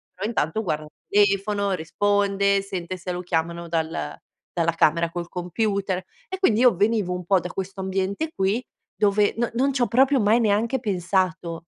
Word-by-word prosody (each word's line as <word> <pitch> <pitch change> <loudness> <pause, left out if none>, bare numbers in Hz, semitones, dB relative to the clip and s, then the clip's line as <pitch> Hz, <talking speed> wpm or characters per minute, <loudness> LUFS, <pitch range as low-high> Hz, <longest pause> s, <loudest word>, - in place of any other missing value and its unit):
però 190 - -4
intanto 220 -3 -1
guarda 155 -5 -2
il 150 - -16 0.3
telefono, 200 0 0
risponde, 200 +3 +1
sente 185 -2 -5
se 180 +1 -5
lo 180 0 -3
chiamano 170 -1 -2
dal 160 - -2 0.4
dalla 165 -1 +1
camera 165 +1 +2
col 175 0 -4
computer, 190 +2 -1 0.3
e 380 - -5
quindi 235 - +3
io 250 -5 +6
venivo 205 -1 +1
un 180 -1 -5
po' 190 +2 +4
da 180 +1 -6
questo 190 +1 -5
ambiente 195 +11 -2
qui 195 +6 0 0.3
dove 205 0 +2
non 235 0 0
non 270 +4 +2
c'ho 255 -3 +1
proprio 265 +3 +4
mai 215 +2 +4
neanche 225 +3 +1
pensato. 185 -4 -1
195 Hz, 170 wpm, -24 LUFS, 175-210 Hz, 0.4 s, io